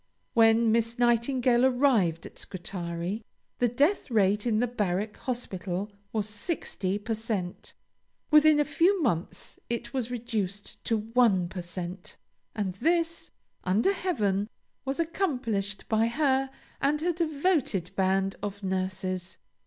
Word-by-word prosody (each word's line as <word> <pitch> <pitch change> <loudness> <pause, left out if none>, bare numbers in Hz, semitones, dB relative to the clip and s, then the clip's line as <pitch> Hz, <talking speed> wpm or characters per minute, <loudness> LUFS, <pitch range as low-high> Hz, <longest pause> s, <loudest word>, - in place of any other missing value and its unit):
When 225 0 +5
Miss 230 +1 +1
Nightingale 240 +1 +3
arrived 245 - +3
at - - -11
Scutari, 175 +2 -4 0.4
the 245 - +4
death 285 - +1
rate 210 -1 +2
in 220 -2 +2
the 240 - +3
Barrack 210 -3 -1
Hospital 200 -5 -3 0.2
was 215 -2 -1
sixty 205 - -2
per 215 +2 -3
cent; 210 -5 -4 0.6
within 305 0 +7
a 295 - +3
few 340 +7 +3
months 175 - -2
it 235 +3 -3
was 250 -3 -1
reduced 215 -5 -4
to 225 - +2
one 220 -4 +3
per 185 -1 -5
cent; 175 +1 -7 0.4
and 200 -4 -1
this, 335 - 0 0.3
under 210 - +2
heaven, 210 - 0 0.4
was 270 +4 -2
accomplished 250 - -1
by 220 +1 +3
her 270 +1 +1 0.3
and 295 +2 +2
her 350 +2 +1
devoted 310 - 0
band 195 0 +1
of 205 0 -5
nurses. 185 -1 -2
225 Hz, 130 wpm, -28 LUFS, 195-265 Hz, 0.6 s, within